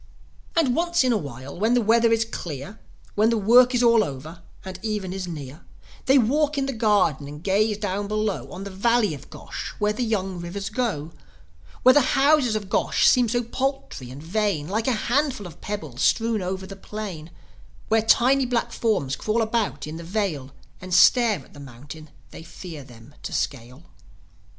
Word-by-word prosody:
And, 285 Hz, -7 st, +2 dB
once 345 Hz, -2 st, +2 dB
in 255 Hz, -2 st, +2 dB
a -, -, +2 dB
while, 135 Hz, -, -8 dB
when 225 Hz, +4 st, +2 dB
the -, -, +4 dB
weather 230 Hz, +1 st, +3 dB
is 225 Hz, 0 st, +2 dB
clear, 175 Hz, -, -7 dB, 0.3 s
When 215 Hz, +2 st, +3 dB
the 230 Hz, -, +1 dB
work 245 Hz, +4 st, +5 dB
is 245 Hz, -, +2 dB
all 230 Hz, -2 st, +5 dB
over, 155 Hz, +4 st, -7 dB, 0.2 s
and 190 Hz, -1 st, -7 dB
even 210 Hz, -4 st, -3 dB
is 190 Hz, -1 st, -5 dB
near, 150 Hz, -3 st, -8 dB, 0.5 s
They 270 Hz, +1 st, +6 dB
walk 290 Hz, +5 st, +2 dB
in 275 Hz, -, +1 dB
the 270 Hz, -, -3 dB
garden 205 Hz, -, +1 dB
and 150 Hz, +2 st, -10 dB
gaze 210 Hz, +2 st, +1 dB
down 205 Hz, -1 st, -3 dB
below 210 Hz, -, -2 dB
On 185 Hz, -, -7 dB
the 200 Hz, -, -7 dB
Valley 215 Hz, 0 st, +2 dB
of 140 Hz, -1 st, -11 dB
Gosh, -, -, -8 dB
where 210 Hz, 0 st, +1 dB
the 215 Hz, -, -5 dB
young 195 Hz, -5 st, -2 dB
rivers 195 Hz, +4 st, -5 dB
go; 210 Hz, -, -2 dB, 0.7 s
Where 255 Hz, -, +8 dB
the 290 Hz, -2 st, +3 dB
houses 275 Hz, -5 st, +4 dB
of 210 Hz, -2 st, -3 dB
Gosh -, -, +2 dB
seem 245 Hz, -3 st, +4 dB
so 240 Hz, +1 st, 0 dB
paltry 265 Hz, -, -3 dB
and 135 Hz, +4 st, -10 dB
vain, 185 Hz, -4 st, -1 dB
Like 220 Hz, +6 st, -2 dB
a 260 Hz, -, +3 dB
handful 250 Hz, 0 st, 0 dB
of 175 Hz, -, -11 dB
pebbles 155 Hz, -12 st, -5 dB
strewn 225 Hz, -2 st, +2 dB
over 190 Hz, +1 st, -4 dB
the 195 Hz, -, -9 dB
plain; 195 Hz, -6 st, -7 dB, 0.6 s
Where 220 Hz, 0 st, +3 dB
tiny 255 Hz, +4 st, +3 dB
black 240 Hz, -1 st, -1 dB
forms 190 Hz, -, 0 dB
crawl 220 Hz, +7 st, 0 dB
about 220 Hz, -10 st, -1 dB
in 155 Hz, +1 st, -7 dB
the 170 Hz, -, -8 dB
vale, 170 Hz, -8 st, -2 dB, 0.3 s
And 185 Hz, -1 st, -2 dB
stare 200 Hz, -, +5 dB
at -, -, -22 dB
the 145 Hz, -, -12 dB
mountain 145 Hz, +4 st, -11 dB, 0.2 s
they -, -, -10 dB
fear 165 Hz, -2 st, -9 dB
them 120 Hz, +1 st, -16 dB
to -, -, -6 dB
scale. 125 Hz, +3 st, -4 dB
205 Hz, 190 wpm, -24 LUFS, 160-235 Hz, 0.7 s, Where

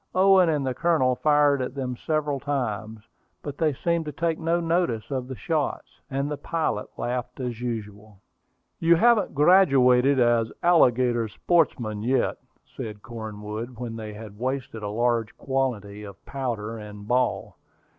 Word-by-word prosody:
Owen 190 Hz, -2 st, +5 dB
and 150 Hz, -3 st, 0 dB
the 130 Hz, -, -1 dB
Colonel 130 Hz, -4 st, +2 dB
fired 145 Hz, -1 st, +3 dB
at 125 Hz, +1 st, -4 dB
them 130 Hz, -2 st, -3 dB
several 150 Hz, 0 st, -1 dB
times; 110 Hz, -6 st, -3 dB, 0.4 s
but 145 Hz, -1 st, -7 dB
they 160 Hz, -2 st, +3 dB
seemed 170 Hz, +4 st, -1 dB
to 150 Hz, -, -4 dB
take 165 Hz, +2 st, -1 dB
no 165 Hz, +1 st, +1 dB
notice 165 Hz, -9 st, -1 dB
of 130 Hz, -2 st, -2 dB
the 130 Hz, -, -6 dB
shots, 150 Hz, +8 st, -2 dB, 0.2 s
and 140 Hz, 0 st, -1 dB
the 150 Hz, 0 st, -3 dB
pilot 155 Hz, -7 st, -2 dB
laughed 125 Hz, +1 st, -4 dB
as 120 Hz, -2 st, -4 dB
usual. 105 Hz, -4 st, -6 dB, 0.6 s
"You 170 Hz, +1 st, +5 dB
haven't 230 Hz, +1 st, +3 dB
graduated 135 Hz, -5 st, +5 dB
as 120 Hz, -2 st, +3 dB
alligator 125 Hz, -8 st, +3 dB
sportsmen 115 Hz, -6 st, 0 dB
yet," 130 Hz, +4 st, +1 dB, 0.4 s
said 105 Hz, -2 st, -7 dB
Cornwood 110 Hz, +1 st, -7 dB
when 120 Hz, -1 st, -5 dB
they 110 Hz, -1 st, -6 dB
had 105 Hz, -1 st, -10 dB
wasted 130 Hz, -3 st, -3 dB
a 105 Hz, -, -4 dB
large 115 Hz, 0 st, 0 dB
quantity 120 Hz, -7 st, -2 dB
of 100 Hz, -2 st, -11 dB
powder 115 Hz, -5 st, -4 dB
and 105 Hz, -1 st, -10 dB
ball. 125 Hz, +1 st, 0 dB
125 Hz, 150 wpm, -25 LUFS, 110-150 Hz, 0.6 s, Owen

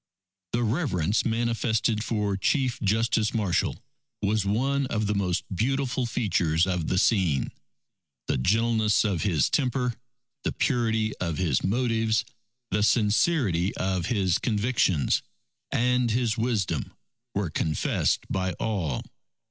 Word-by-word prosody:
The 120 Hz, +1 st, +1 dB
reverence 110 Hz, -, 0 dB
manifested 115 Hz, -1 st, 0 dB
for 105 Hz, -4 st, -1 dB
Chief 125 Hz, +5 st, 0 dB
Justice 110 Hz, +1 st, +1 dB
Marshall, 100 Hz, -6 st, 0 dB, 0.4 s
was 105 Hz, 0 st, +1 dB
one 135 Hz, +6 st, +1 dB
of 110 Hz, -4 st, -1 dB
the 105 Hz, -, 0 dB
most 90 Hz, -3 st, 0 dB
beautiful 130 Hz, +3 st, 0 dB
features 90 Hz, -8 st, +1 dB
of 90 Hz, -4 st, -2 dB
the 95 Hz, -, 0 dB
scene. 90 Hz, -, +2 dB, 0.7 s
The -, -, 0 dB
gentleness 110 Hz, -, +2 dB
of 95 Hz, -6 st, 0 dB
his 90 Hz, -8 st, +2 dB
temper, 125 Hz, -3 st, 0 dB, 0.5 s
the -, -, -1 dB
purity 110 Hz, -5 st, 0 dB
of 85 Hz, -3 st, -2 dB
his 80 Hz, -9 st, +1 dB
motives, 115 Hz, 0 st, +1 dB, 0.5 s
the 105 Hz, -, +1 dB
sincerity 105 Hz, -, +2 dB
of 95 Hz, -2 st, -1 dB
his 95 Hz, -7 st, +1 dB
convictions 105 Hz, -, +1 dB, 0.5 s
and 125 Hz, 0 st, +2 dB
his 115 Hz, -1 st, +1 dB
wisdom, 105 Hz, -, -1 dB, 0.4 s
were 100 Hz, -5 st, -1 dB
confessed 80 Hz, 0 st, 0 dB
by 95 Hz, -1 st, -1 dB
all. 85 Hz, -, -2 dB
110 Hz, 120 wpm, -26 LUFS, 95-120 Hz, 0.7 s, scene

